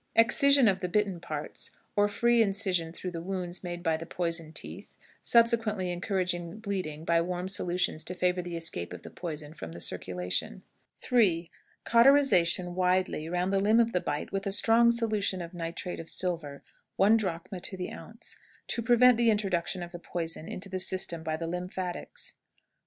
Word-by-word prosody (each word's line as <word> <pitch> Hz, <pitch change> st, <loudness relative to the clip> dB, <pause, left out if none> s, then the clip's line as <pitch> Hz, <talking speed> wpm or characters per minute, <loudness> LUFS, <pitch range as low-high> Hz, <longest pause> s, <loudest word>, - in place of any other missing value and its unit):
Excision 265 Hz, +3 st, +6 dB
of 190 Hz, -2 st, +2 dB
the 180 Hz, -2 st, -3 dB
bitten 200 Hz, -2 st, 0 dB
parts, 155 Hz, -3 st, -5 dB, 0.3 s
or 205 Hz, 0 st, +4 dB
free 235 Hz, +3 st, +3 dB
incision 195 Hz, -5 st, +1 dB
through 180 Hz, +2 st, -6 dB
the 165 Hz, -1 st, -5 dB
wounds 180 Hz, 0 st, -2 dB
made 175 Hz, -1 st, -5 dB
by 165 Hz, -2 st, +1 dB
the 165 Hz, -, -7 dB
poison 170 Hz, -3 st, -2 dB
teeth, -, -, -7 dB, 0.2 s
subsequently 225 Hz, -5 st, +3 dB
encouraging 180 Hz, -1 st, -2 dB
the 165 Hz, -, -10 dB
bleeding 185 Hz, -8 st, -4 dB
by 170 Hz, 0 st, +3 dB
warm 180 Hz, +1 st, -3 dB
solutions 180 Hz, -4 st, 0 dB
to 180 Hz, -, -4 dB
favor 180 Hz, 0 st, +1 dB
the 175 Hz, -1 st, -5 dB
escape 165 Hz, -, -2 dB
of -, -, -9 dB
the -, -, -10 dB
poison 155 Hz, -3 st, -7 dB
from 80 Hz, -, -8 dB
the 85 Hz, -, -9 dB
circulation. 90 Hz, -7 st, -3 dB, 0.3 s
3. 180 Hz, -9 st, +2 dB, 0.3 s
Cauterization 235 Hz, -9 st, +4 dB
widely 180 Hz, -3 st, 0 dB
round 180 Hz, +2 st, 0 dB
the 195 Hz, -, +3 dB
limb 215 Hz, +3 st, +4 dB
of 230 Hz, 0 st, +2 dB
the 180 Hz, -, +1 dB
bite 145 Hz, 0 st, -3 dB
with 195 Hz, +1 st, -2 dB
a -, -, 0 dB
strong 230 Hz, +3 st, +5 dB
solution 215 Hz, -5 st, 0 dB
of 170 Hz, 0 st, -7 dB
nitrate 170 Hz, +1 st, -5 dB
of 165 Hz, -, -8 dB
silver, 165 Hz, -6 st, -2 dB, 0.3 s
one 205 Hz, +3 st, +5 dB
drachm 185 Hz, -2 st, -3 dB
to 190 Hz, +1 st, -5 dB
the 180 Hz, -, -5 dB
ounce, -, -, -10 dB, 0.3 s
to 235 Hz, -, -2 dB
prevent 245 Hz, +1 st, +5 dB
the 235 Hz, -1 st, +4 dB
introduction 190 Hz, -4 st, 0 dB
of 175 Hz, -, -8 dB
the 175 Hz, -, -8 dB
poison 165 Hz, -1 st, -4 dB
into 185 Hz, -, -5 dB
the 190 Hz, -1 st, -4 dB
system 185 Hz, -3 st, -1 dB
by 160 Hz, -1 st, -2 dB
the 165 Hz, -, -4 dB
lymphatics. 180 Hz, +1 st, -4 dB
180 Hz, 180 wpm, -29 LUFS, 170-205 Hz, 0.3 s, Excision